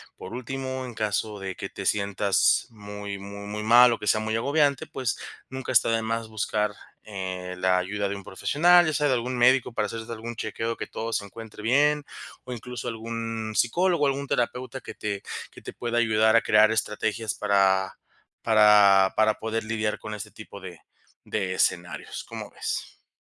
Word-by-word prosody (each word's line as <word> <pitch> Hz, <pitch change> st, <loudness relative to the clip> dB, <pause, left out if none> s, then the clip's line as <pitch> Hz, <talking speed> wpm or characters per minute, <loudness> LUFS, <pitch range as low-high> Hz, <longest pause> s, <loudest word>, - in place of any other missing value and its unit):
Por -, -, -9 dB
último, 130 Hz, +1 st, -4 dB
en 120 Hz, -, -8 dB
caso 105 Hz, 0 st, -2 dB
de 95 Hz, -1 st, -5 dB
que -, -, -6 dB
te -, -, -8 dB
sientas 100 Hz, -1 st, +2 dB
muy 105 Hz, -2 st, -7 dB
muy 100 Hz, +1 st, -8 dB
muy 105 Hz, +1 st, -4 dB
mal 120 Hz, +2 st, +7 dB
o 115 Hz, -, -1 dB
que 105 Hz, -, -6 dB
sea 110 Hz, +2 st, +3 dB
muy 110 Hz, 0 st, -1 dB
agobiante, 140 Hz, +2 st, +1 dB
pues 130 Hz, -3 st, -2 dB, 0.3 s
nunca 130 Hz, 0 st, -5 dB
está 115 Hz, -, +4 dB
de 115 Hz, 0 st, +1 dB
más 115 Hz, 0 st, -2 dB
buscar, 105 Hz, -1 st, -1 dB, 0.4 s
eh, 95 Hz, -2 st, -5 dB
la 90 Hz, 0 st, +2 dB
ayuda 100 Hz, +2 st, -2 dB
de 100 Hz, -, -3 dB
un 100 Hz, -, -10 dB
profesional, 175 Hz, -, +4 dB
ya 155 Hz, -, 0 dB
sea 150 Hz, -1 st, +2 dB
de 130 Hz, -, +3 dB
algún 125 Hz, +1 st, -2 dB
médico 125 Hz, +1 st, +4 dB
para 105 Hz, -, 0 dB
hacerte 115 Hz, +2 st, -6 dB
algún 115 Hz, +1 st, -6 dB
chequeo 115 Hz, +1 st, -3 dB
que -, -, -6 dB
todo 115 Hz, +1 st, -5 dB
se 100 Hz, -, 0 dB
encuentre 110 Hz, +1 st, -10 dB
bien, 145 Hz, +5 st, +3 dB, 0.4 s
o 125 Hz, -, -9 dB
incluso 125 Hz, 0 st, -5 dB
algún 115 Hz, -1 st, -4 dB
psicólogo, 170 Hz, +5 st, +2 dB
algún 140 Hz, +1 st, -2 dB
terapeuta 130 Hz, +2 st, -2 dB
que -, -, -8 dB
te 100 Hz, -2 st, -4 dB, 0.3 s
que -, -, -14 dB
te -, -, -7 dB
pueda 120 Hz, 0 st, -1 dB
ayudar 110 Hz, -1 st, +3 dB
a 115 Hz, -, +6 dB
crear 110 Hz, 0 st, +5 dB
estrategias 110 Hz, 0 st, -1 dB
para 95 Hz, -2 st, +2 dB, 0.4 s
para 105 Hz, -3 st, +6 dB
para 110 Hz, 0 st, +3 dB
poder 110 Hz, 0 st, -3 dB
lidiar 110 Hz, -1 st, -2 dB
con 110 Hz, -, -7 dB
este 105 Hz, -2 st, -7 dB
tipo 105 Hz, -2 st, -11 dB
de 90 Hz, -4 st, -10 dB, 0.4 s
de 95 Hz, -3 st, -2 dB
escenarios, 85 Hz, -4 st, -1 dB
¿cómo -, -, -7 dB
ves? -, -, -5 dB
110 Hz, 185 wpm, -26 LUFS, 100-120 Hz, 0.4 s, mal